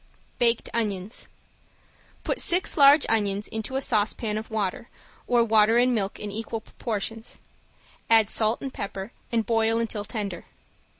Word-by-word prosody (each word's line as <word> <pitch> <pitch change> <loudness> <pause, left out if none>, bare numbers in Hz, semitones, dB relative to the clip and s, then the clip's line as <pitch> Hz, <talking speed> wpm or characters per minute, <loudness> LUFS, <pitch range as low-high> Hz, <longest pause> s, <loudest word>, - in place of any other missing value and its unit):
~BAKED 235 -1 +2
ONIONS~ 205 -2 -3 1.0
Put - - -2
six 355 +2 +1
large 285 0 +7
onions 205 -2 0
into 220 +4 -5
a 270 - 0
saucepan 215 -2 0
of 215 +1 -5
water, 215 0 -3 0.4
or 240 -1 +4
water 220 0 +4
and 250 +1 +3
milk 200 -4 -2
in 210 - -5
equal 225 +1 -4
proportions, 225 0 -5 0.7
add 225 -2 +6
salt 220 +2 +2
and 270 - -5
pepper 195 +1 -6 0.2
and 225 -2 +1
boil 225 0 +2
until 225 -2 -2
tender. 205 -5 -5
220 Hz, 140 wpm, -25 LUFS, 210-235 Hz, 1.0 s, large